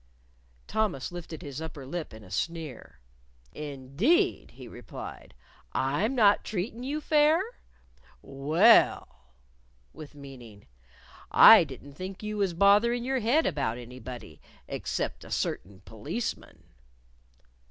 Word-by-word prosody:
Thomas 210 -12 -2
lifted 175 -1 -8
his 145 0 -7
upper 155 -4 -7
lip 160 +4 -5
in 110 0 -12
a 95 - -15
sneer. 150 - -5 0.5
"Indeed!" 150 - 0
he - - -11
replied. - - -10 0.4
"I'm 150 - 0
not 205 -4 +4
treatin' 220 +4 -4
you 285 +4 -3
fair? 305 +1 +4 0.8
Well," 140 - +3 0.6
(with 150 -1 -11
meaning) 125 -7 -12 0.6
"I - - +9
didn't 145 - -11
think 185 +6 -8
you 210 0 -4
was 195 -4 0
botherin' 210 +6 +4
your 265 +1 -1
head 250 +8 +2
about 120 -5 -1
anybody 120 - -10 0.3
except - - -4
a - - -12
certain 95 +1 -3
policeman." 110 - -6
160 Hz, 110 wpm, -28 LUFS, 130-220 Hz, 0.8 s, I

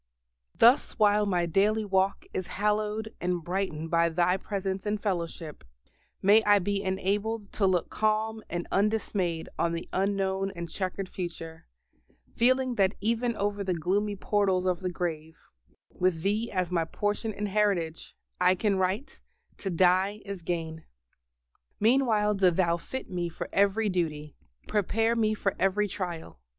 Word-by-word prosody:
Thus 240 +4 +4
while 210 -1 +4
my 175 -3 +1
daily 210 +6 +2
walk 190 0 +1
is 185 - -3
hallowed 210 +1 0
and 175 -1 -1
brightened 175 -3 -3
by 170 0 +3
Thy 175 +2 +2
presence 195 0 -3
and 210 0 0
fellowship, 170 - -4 0.6
may 210 +3 +6
I 205 0 +5
be 200 +1 -1
enabled 200 +3 -2
to 195 - +1
look 180 -3 0
calm 215 +1 0
and 175 0 -3
undismayed 195 -5 0
on 170 0 +1
the 170 - -4
unknown 195 0 0
and 170 0 -5
chequered 185 +3 -4
future, 165 -3 -7 0.7
feeling 255 +1 +3
that 195 0 +3
even 230 +3 0
over 205 0 -1
the 185 -2 -1
gloomy 200 +5 0
portals 190 -2 +1
of 180 -2 +1
the 185 - -2
grave, 165 -3 -4 0.5
with 180 -3 0
Thee 215 +4 0
as 185 -2 -1
my 170 -2 +1
Portion 205 +5 -2
and 205 0 -4
Heritage, 190 -6 0 0.2
I 180 +1 +4
can 200 +1 +1
write, 190 +9 -2 0.4
"To 195 - -4
die 185 +4 +2
is 200 -2 -6
gain!" 165 -2 -4 1.0
Meanwhile 220 -3 +3
do 195 -2 +4
Thou 170 -1 +1
fit 260 +9 -6
me 175 -1 -2
for 165 - -6
every 200 +2 +2
duty, 155 -6 -2 0.3
prepare 225 +3 +1
me 215 -2 +1
for 195 -2 -1
every 205 +2 +2
trial. 175 - -6
195 Hz, 150 wpm, -28 LUFS, 175-210 Hz, 1.0 s, may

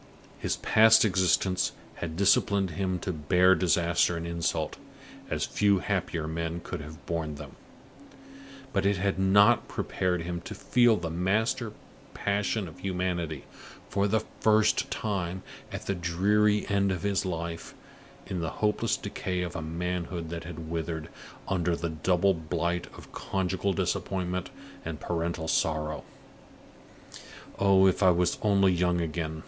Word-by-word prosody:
His - - -1
past 110 +1 +6
existence 95 -1 +2 0.2
had 80 -1 -5
disciplined 100 -1 +3
him 95 +3 -1
to 95 - -2
bear 90 +4 +4
disaster 85 -1 +2
and 85 - -5
insult, 85 -2 -2 0.5
as - - -1
few 100 -1 +2
happier 90 -5 -2
men 85 +1 -3
could - - -6
have 80 +3 -11
borne 80 -3 -3
them; 70 -1 -9 1.2
but - - +1
it 100 0 +2
had 95 +1 0
not 100 +2 +5
prepared 90 -2 -1
him 85 0 -4
to - - -8
feel 120 0 +3
the 85 -3 -4
master 105 +7 0 0.4
passion 100 0 -1
of 80 - -12
humanity, 90 -5 -2 0.4
for 100 0 +1
the 110 +1 +2 0.2
first 110 0 +3
time, 95 -4 -3 0.3
at - - -6
the 100 - 0
dreary 100 +4 +2
end 100 -1 +2
of 90 -3 -3
his 100 -1 +1
life, 85 -2 -5 0.5
in 95 - -4
the 80 -1 -2
hopeless 105 -1 +1
decay 90 -1 -3
of 85 -1 -5
a 80 - -3
manhood 85 +1 -3
that 85 0 -6
had 80 -1 -7
withered 80 -1 -4 0.4
under 90 -2 +1
the 85 0 -3
double 90 +4 +2
blight 85 +1 -2
of - - -13
conjugal 95 +1 -1
disappointment 90 0 -2 0.3
and 80 -2 -5
parental 85 0 -2
sorrow. 75 -2 0 1.6
"Oh, 95 -1 +5
if 95 0 +3
I 95 - +6
was 90 0 +2
only 100 -3 +4
young 90 0 +1
again!" 80 -1 -3
90 Hz, 140 wpm, -28 LUFS, 85-100 Hz, 1.6 s, past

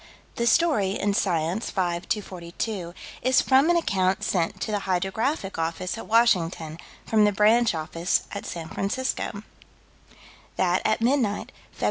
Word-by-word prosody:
The 235 - 0
story, 225 - +3
in 205 0 +1
Science, 180 +1 0
5 175 -2 -2
242, 180 -1 -4 0.3
is 255 +1 +4
from 270 +4 +4
an 345 - +4
account 190 - 0
sent 170 -3 -1
to 220 - -2
the 205 - 0
Hydrographic 195 - -1
Office, 165 +4 -2
at 225 - -8
Washington, 175 -8 +2 0.3
from 215 -1 +3
the 210 - +4
branch 215 +1 +3
office, 165 +2 -1
at 200 - -6
San 165 -2 -6
Francisco: 210 0 -3 1.1
That, 180 0 +1
at 215 +1 +1
midnight, 240 -5 +1 0.3
Feb. - - -17
200 Hz, 140 wpm, -25 LUFS, 175-225 Hz, 1.1 s, is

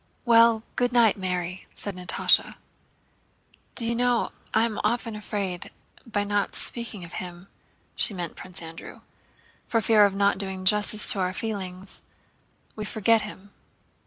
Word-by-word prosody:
"Well, 230 -1 +5
good 245 -1 +1
night, 235 -4 +5
Mary!" 180 -1 -3
said 200 -3 -6
Natásha. 180 0 +3 1.2
"Do 235 - +2
you 230 - 0
know, 245 0 +1 0.2
I 220 - +3
am 220 -2 -3
often 230 +1 -1
afraid 200 -4 -4
that 230 - -17
by 205 -1 0
not 205 0 -1
speaking 230 -6 -4
of 170 - -13
him" 180 -1 -7 0.5
(she - - +5
meant 175 -2 -5
Prince 180 -2 -6
Andrew) 165 0 -10 0.7
"for 230 - +1
fear 215 0 +5
of 195 - -6
not 200 -1 +2
doing 190 -1 -5
justice 210 +2 +4
to 200 - 0
our 185 0 0
feelings, 190 -3 -6 0.7
we 215 - -5
forget 220 +1 +2
him." 200 -1 -10
205 Hz, 150 wpm, -25 LUFS, 185-225 Hz, 1.2 s, Well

